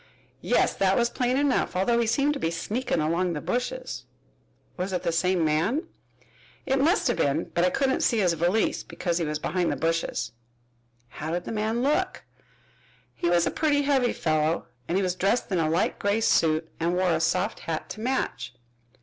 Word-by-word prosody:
"Yes, -, -, +2 dB
that 195 Hz, 0 st, +3 dB
was 235 Hz, -1 st, +2 dB
plain 250 Hz, +1 st, 0 dB
enough, 280 Hz, -8 st, +1 dB
although 235 Hz, +6 st, +2 dB
he 235 Hz, -, +1 dB
seemed 280 Hz, +6 st, +2 dB
to 290 Hz, -, -5 dB
be 165 Hz, -, 0 dB
sneakin' 210 Hz, +5 st, -2 dB
along 170 Hz, +3 st, 0 dB
the 150 Hz, -, -3 dB
bushes." 245 Hz, -, -3 dB, 0.7 s
"Was 185 Hz, +1 st, -3 dB
it 180 Hz, -1 st, -2 dB
the 170 Hz, -, +1 dB
same 180 Hz, 0 st, +1 dB
man?" 165 Hz, -, +1 dB, 0.8 s
"It 270 Hz, 0 st, +1 dB
must 335 Hz, +9 st, +3 dB
have -, -, +1 dB
been, 145 Hz, +4 st, 0 dB
but 170 Hz, -, +2 dB
I 180 Hz, -, +4 dB
couldn't 265 Hz, +6 st, 0 dB
see 235 Hz, -, +2 dB
his 180 Hz, -5 st, +3 dB
valise, 175 Hz, +7 st, +1 dB
because 175 Hz, -1 st, -3 dB
he 165 Hz, -, 0 dB
was 150 Hz, 0 st, -2 dB
behind 175 Hz, +3 st, -1 dB
the -, -, -1 dB
bushes." 165 Hz, 0 st, -1 dB, 0.8 s
"How 155 Hz, +5 st, -6 dB
did 175 Hz, +2 st, -2 dB
the -, -, -6 dB
man 220 Hz, +2 st, -1 dB
look?" 290 Hz, +3 st, 0 dB, 0.9 s
"He 170 Hz, -, -1 dB
was 175 Hz, -1 st, +3 dB
a -, -, 0 dB
putty 290 Hz, -2 st, +1 dB
heavy 270 Hz, -4 st, +2 dB
fellow 155 Hz, 0 st, 0 dB, 0.2 s
and 180 Hz, -, 0 dB
he 195 Hz, -, +1 dB
was 180 Hz, -1 st, 0 dB
dressed 195 Hz, +5 st, 0 dB
in 185 Hz, -, +1 dB
a 155 Hz, -1 st, +1 dB
light 165 Hz, +4 st, 0 dB
gray 205 Hz, +2 st, +1 dB
suit 160 Hz, -6 st, +2 dB
and 170 Hz, +2 st, 0 dB
wore 180 Hz, -1 st, +2 dB
a 160 Hz, -, +1 dB
soft 185 Hz, +5 st, 0 dB
hat 160 Hz, -1 st, -4 dB
to -, -, -7 dB
match." 245 Hz, -, -2 dB
185 Hz, 195 wpm, -26 LUFS, 165-240 Hz, 0.9 s, I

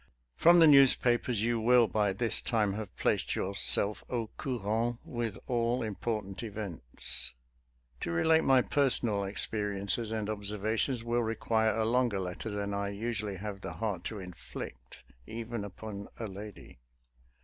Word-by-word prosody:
From 170 Hz, +1 st, +6 dB
the 165 Hz, -, +8 dB
newspapers 125 Hz, -5 st, +5 dB
you 120 Hz, 0 st, +1 dB
will 120 Hz, +1 st, +5 dB
by 105 Hz, -2 st, +1 dB
this 115 Hz, +4 st, +1 dB
time 105 Hz, -4 st, +1 dB
have 105 Hz, 0 st, -7 dB
placed -, -, 0 dB
yourself 100 Hz, +1 st, +2 dB
au 115 Hz, -3 st, -3 dB
coura/nt 115 Hz, -1 st, -1 dB
with 115 Hz, -3 st, -3 dB
all 120 Hz, 0 st, 0 dB
important 105 Hz, -2 st, -3 dB
events. 100 Hz, -, -3 dB, 0.6 s
To -, -, -4 dB
relate 160 Hz, -, +3 dB
my 130 Hz, -2 st, +5 dB
personal 120 Hz, -7 st, +2 dB
experiences 105 Hz, +2 st, -1 dB
and 110 Hz, -2 st, -2 dB
observations 110 Hz, +4 st, -1 dB
will 120 Hz, +1 st, 0 dB
require 110 Hz, -1 st, 0 dB
a 110 Hz, -, +1 dB
longer 120 Hz, -3 st, +1 dB
letter 90 Hz, +4 st, -4 dB
than 100 Hz, -1 st, -3 dB
I 100 Hz, 0 st, -1 dB
usually 105 Hz, -1 st, -3 dB
have 100 Hz, +1 st, -6 dB
the 95 Hz, -, -6 dB
heart 105 Hz, 0 st, -3 dB
to 110 Hz, -, -4 dB
inflict, 85 Hz, -9 st, -9 dB, 0.2 s
even 115 Hz, -1 st, -5 dB
upon 100 Hz, 0 st, -7 dB
a 115 Hz, -, -4 dB
lady. 100 Hz, -7 st, -10 dB
110 Hz, 140 wpm, -31 LUFS, 100-120 Hz, 0.6 s, the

